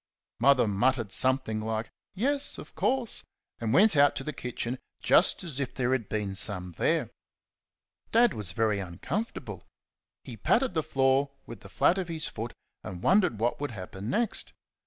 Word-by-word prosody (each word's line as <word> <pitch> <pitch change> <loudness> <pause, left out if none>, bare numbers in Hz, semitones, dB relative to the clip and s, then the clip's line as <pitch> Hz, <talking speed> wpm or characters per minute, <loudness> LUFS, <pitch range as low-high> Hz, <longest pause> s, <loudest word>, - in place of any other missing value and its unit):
Mother 130 -1 +5
muttered 115 +1 +1
something 130 -4 +2
like 110 0 -3 0.2
"Yes, 275 +7 +1
of - - -11
course," 255 -3 0 0.4
and 115 -2 -2
went 195 - +5
out 145 0 +5
to - - -4
the 150 - -4
kitchen 125 0 -4 0.2
just - - +3
as 150 -6 -4
if 135 -3 -3
there 125 -1 0
had 125 -6 -1
been 105 -2 -2
some 95 -2 -2
there. - - +1 1.0
Dad 235 0 +5
was 105 -5 0
very 105 +1 +1
uncomfortable. 100 - -5 0.6
He - - -8
patted 260 -6 +2
the 160 - +1
floor 135 -2 +2 0.2
with 115 - -9
the 100 - -12
flat 180 - +2
of 185 - -3
his 160 -2 -2
foot 115 +2 -6 0.3
and 90 -1 -7
wondered 185 - +3
what 120 +5 0
would 145 - -2
happen 95 -1 -7
next. 225 - -1
130 Hz, 165 wpm, -28 LUFS, 110-165 Hz, 1.0 s, Mother